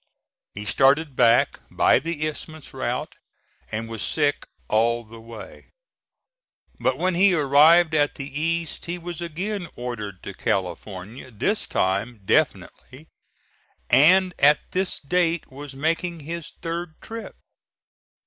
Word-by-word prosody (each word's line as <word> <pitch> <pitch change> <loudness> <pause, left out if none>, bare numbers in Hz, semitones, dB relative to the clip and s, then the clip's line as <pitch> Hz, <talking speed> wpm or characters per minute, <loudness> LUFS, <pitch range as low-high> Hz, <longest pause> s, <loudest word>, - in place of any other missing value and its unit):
He 105 +1 -6
started 140 +5 +3
back 115 0 +4
by - - +4
the 160 -2 -3
Isthmus 155 0 -8
route - - -3 0.6
and 115 +1 -3
was 115 -2 -6
sick 145 +3 0 0.2
all 115 +2 +2
the 115 +1 -13
way. 115 -1 -11 1.1
But - - +1
when 185 0 +1
he 185 +1 +4
arrived 155 +3 +5
at 145 -2 +2
the 140 - -6
East 165 +3 -2
he 175 +1 -3
was 175 -1 -7
again 180 +3 -4
ordered 105 -6 -6
to 100 - -7
California, 95 +6 -4
this 165 - -1
time 100 +4 -1
definitely, 135 +9 -1 0.8
and 185 +5 +6
at 145 +1 +4
this 185 0 -1
date 170 0 0
was 140 +1 -9
making 165 +3 -1
his 165 +2 -6
third 165 -1 -4
trip. 225 0 -8
150 Hz, 125 wpm, -24 LUFS, 115-170 Hz, 1.1 s, and